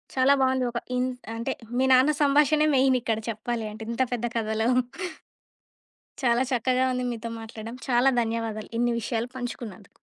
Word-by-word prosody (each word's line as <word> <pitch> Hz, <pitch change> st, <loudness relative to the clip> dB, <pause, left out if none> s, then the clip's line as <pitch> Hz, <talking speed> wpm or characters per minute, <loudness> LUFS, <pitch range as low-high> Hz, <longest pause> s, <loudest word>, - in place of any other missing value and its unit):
చాలా 265 Hz, +1 st, +5 dB
బావుంది. 260 Hz, -1 st, +2 dB
ఒక 235 Hz, -, -2 dB, 0.2 s
ఇంట్ 255 Hz, 0 st, -1 dB, 0.2 s
అంటే, 230 Hz, -, -2 dB, 0.2 s
మీ 260 Hz, -, +3 dB
నాన్న 260 Hz, +4 st, +6 dB
సంభాషనే 295 Hz, +2 st, +4 dB
మెయినిక్కడ 255 Hz, -4 st, +2 dB
చెప్పాలి 230 Hz, +1 st, -3 dB
అంటే, 220 Hz, +1 st, -8 dB
ఇంత 235 Hz, -, -2 dB
పెద్ద 240 Hz, -1 st, -2 dB
కథలో. 220 Hz, 0 st, 0 dB, 1.5 s
చాలా 240 Hz, 0 st, +3 dB
చక్కగా 255 Hz, +1 st, +2 dB
ఉంది 250 Hz, -, -2 dB
మీతో 230 Hz, 0 st, -5 dB
మాట్లాడడం. 225 Hz, +1 st, -8 dB
చాలా 250 Hz, +2 st, +4 dB
ధన్యవాదాలు. 225 Hz, -2 st, -3 dB
ఇన్ని 240 Hz, +1 st, +2 dB
విషయాలు 235 Hz, +1 st, -2 dB
పంచుకున్నందుకు. 235 Hz, -5 st, -7 dB
240 Hz, 140 wpm, -26 LUFS, 225-260 Hz, 1.5 s, నాన్న